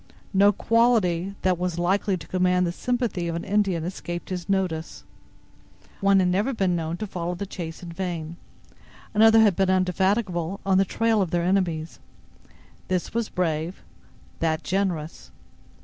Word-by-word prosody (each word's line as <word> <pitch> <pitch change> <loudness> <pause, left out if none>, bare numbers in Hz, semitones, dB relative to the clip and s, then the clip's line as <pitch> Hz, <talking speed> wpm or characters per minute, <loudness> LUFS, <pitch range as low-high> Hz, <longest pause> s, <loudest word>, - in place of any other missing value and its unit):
No 200 +1 +6
quality 200 -5 +2
that 185 -2 +2
was 180 -2 -2
likely 190 +2 +1
to - - -11
command 180 0 +2
the 170 - -1
sympathy 230 -4 -2
of 165 - -2
an 170 - -4
Indian 195 -5 +1
escaped 175 -1 -5
his 180 0 -4
notice. 180 -5 -2 1.0
One 195 -1 +4
had 180 -1 +2
never 205 +9 +1
been 190 -4 +1
known 165 0 -3
to 215 - -4
follow 180 -3 -4
the 200 - -4
chase 170 -3 -7
in 170 - -7
vain; 170 -2 -4 0.8
another 225 +1 +6
had 210 -5 +4
been 190 +1 +1
indefatigable 185 0 0
on 190 -1 +3
the 195 - +4
trail 225 +2 +1
of 185 - 0
their 175 0 0
enemies. 175 -4 0 0.9
This 185 -1 -2
was 230 -1 -1
brave, 165 - -2 0.6
that 160 0 0
generous. 180 -5 -2
185 Hz, 155 wpm, -25 LUFS, 170-200 Hz, 1.0 s, No